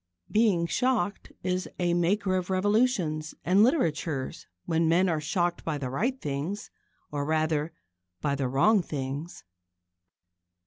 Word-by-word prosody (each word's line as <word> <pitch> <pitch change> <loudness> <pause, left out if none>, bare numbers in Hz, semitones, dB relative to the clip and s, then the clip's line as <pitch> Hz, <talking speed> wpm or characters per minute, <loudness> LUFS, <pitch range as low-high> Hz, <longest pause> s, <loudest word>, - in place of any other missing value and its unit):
Being 210 -6 +3
shocked 215 -1 0
is 185 0 -1
a 175 -1 +1
maker 185 +3 +1
of 185 0 -2
revolutions 185 -6 +1
and 185 +4 +5
literatures 165 - 0 0.2
when 165 0 +2
men 180 +3 +4
are 160 -3 0
shocked 175 +3 -1
by 155 -2 -2
the 130 -3 -4
right 245 - -1
things 150 - -4 0.4
or, 145 -1 -2
rather, 155 +1 0 0.5
by 140 +7 0
the 140 -2 -1
wrong 185 - +4
things. 140 - -5
170 Hz, 130 wpm, -28 LUFS, 150-195 Hz, 0.5 s, and